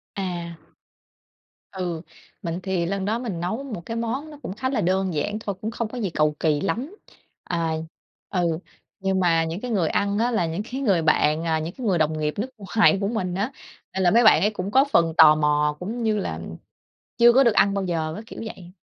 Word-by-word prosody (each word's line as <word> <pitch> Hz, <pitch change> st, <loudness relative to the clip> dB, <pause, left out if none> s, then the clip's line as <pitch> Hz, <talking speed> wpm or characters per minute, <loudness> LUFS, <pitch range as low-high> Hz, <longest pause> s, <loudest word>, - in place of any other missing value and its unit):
À. 175 Hz, -3 st, -4 dB, 1.2 s
Ừ, 175 Hz, -3 st, -3 dB, 0.4 s
mình 170 Hz, +1 st, -3 dB
thì 180 Hz, -3 st, -1 dB
lần 195 Hz, +1 st, -2 dB
đó 220 Hz, +3 st, 0 dB
mình 215 Hz, -9 st, -4 dB
nấu 220 Hz, +10 st, -2 dB
một 225 Hz, -11 st, -6 dB
cái 230 Hz, -, -4 dB
món 255 Hz, +7 st, -3 dB
nó 295 Hz, -, -11 dB
cũng -, -, -5 dB
khá 260 Hz, +6 st, -2 dB
là 265 Hz, -, 0 dB
đơn 185 Hz, 0 st, 0 dB
giản 205 Hz, +9 st, -1 dB
thôi, 200 Hz, -3 st, -4 dB
cũng 220 Hz, -, -3 dB
không 230 Hz, 0 st, -3 dB
có 250 Hz, -, -7 dB
gì 205 Hz, -6 st, -1 dB
cầu 150 Hz, -2 st, +1 dB
kỳ 150 Hz, -3 st, +2 dB
lắm. 255 Hz, -, -2 dB, 0.5 s
À, 170 Hz, -2 st, -1 dB, 0.6 s
ừ. 170 Hz, -4 st, 0 dB, 0.4 s
Nhưng 190 Hz, 0 st, 0 dB
mà 165 Hz, -2 st, +3 dB
những 165 Hz, +4 st, -4 dB
cái 250 Hz, -, -5 dB
người 185 Hz, -8 st, +1 dB
ăn 200 Hz, 0 st, 0 dB
á, 235 Hz, +2 st, +2 dB
là 220 Hz, -8 st, +1 dB
những 165 Hz, +5 st, -3 dB
cái 265 Hz, -, -3 dB
người 195 Hz, -11 st, +2 dB
bạn, 155 Hz, +1 st, +2 dB
à, 160 Hz, -1 st, +1 dB
những 160 Hz, +3 st, -5 dB
người 205 Hz, -8 st, +1 dB
đồng 155 Hz, 0 st, +1 dB
nghiệp 150 Hz, 0 st, -1 dB
nước 240 Hz, +6 st, -2 dB
ngoài 205 Hz, 0 st, +3 dB
của 200 Hz, -, 0 dB
mình 185 Hz, -6 st, -2 dB
á. 205 Hz, +8 st, -2 dB, 0.4 s
Nên 190 Hz, -, 0 dB
là 175 Hz, -, +5 dB
mấy 235 Hz, +1 st, +5 dB
bạn 220 Hz, -, +7 dB
ấy 210 Hz, -, +3 dB
cũng 195 Hz, -2 st, -4 dB
có 265 Hz, +5 st, +5 dB
phần 165 Hz, -1 st, +3 dB
tò 155 Hz, -1 st, +9 dB
mò 150 Hz, 0 st, +1 dB
cũng 225 Hz, +7 st, -4 dB
như 215 Hz, -2 st, +1 dB
là 80 Hz, -, -3 dB, 0.8 s
chưa 240 Hz, 0 st, +7 dB
có 270 Hz, +2 st, +6 dB
được 235 Hz, -4 st, +4 dB
ăn 200 Hz, -1 st, +4 dB
bao 200 Hz, -1 st, -1 dB
giờ 160 Hz, -3 st, -2 dB
á, 210 Hz, -, -6 dB
kiểu 230 Hz, -, -10 dB
vậy. 180 Hz, -5 st, -9 dB
190 Hz, 225 wpm, -24 LUFS, 165-220 Hz, 1.2 s, tò